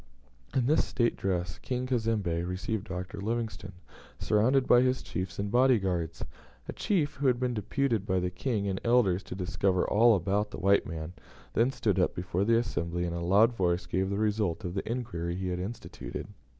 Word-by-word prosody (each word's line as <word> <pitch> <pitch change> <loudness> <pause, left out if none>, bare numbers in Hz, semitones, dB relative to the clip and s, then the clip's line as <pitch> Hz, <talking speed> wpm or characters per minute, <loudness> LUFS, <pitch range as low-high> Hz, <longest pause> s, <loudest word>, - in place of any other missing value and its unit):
In 130 -3 +2
this 150 +5 +3
state 120 -2 0
dress, 90 -3 -2
King 125 0 -3
Cazembe 110 -9 0
received 95 +4 -3
Dr. 90 +2 -5
Livingstone, 110 -2 -3 0.4
surrounded 125 +5 +2
by 120 - +6
his 130 0 +1
chiefs 95 +1 -4
and 100 0 -2
body 125 +1 +5
guards. 85 -4 -2 0.4
A - - -4
chief, 165 -8 0
who 140 0 +1
had 125 -2 +3
been 125 -1 0
deputed 115 0 -1
by 95 -1 +2
the 90 0 -2
King 105 +1 -2
and 95 -1 -2
elders 115 -6 +3
to - - -8
discover 90 0 0
all 115 +2 +5
about 100 +3 0
the - - -7
white 100 +2 +3
man, 80 +1 -6 0.4
then 115 +3 +3
stood 135 - 0
up - - +1
before 90 +2 -1
the 115 +1 +4
assembly, 90 -7 -2
and 85 -1 -2
in 85 - -3
a - - -3
loud 105 +7 +4
voice 90 -4 0
gave 95 +2 -1
the 100 - -1
result 105 -5 0
of 90 - -3
the 100 +3 -3
inquiry 85 -9 -3
he 95 0 -3
had 90 0 -2
instituted. 105 +6 -6
100 Hz, 195 wpm, -29 LUFS, 90-120 Hz, 0.4 s, by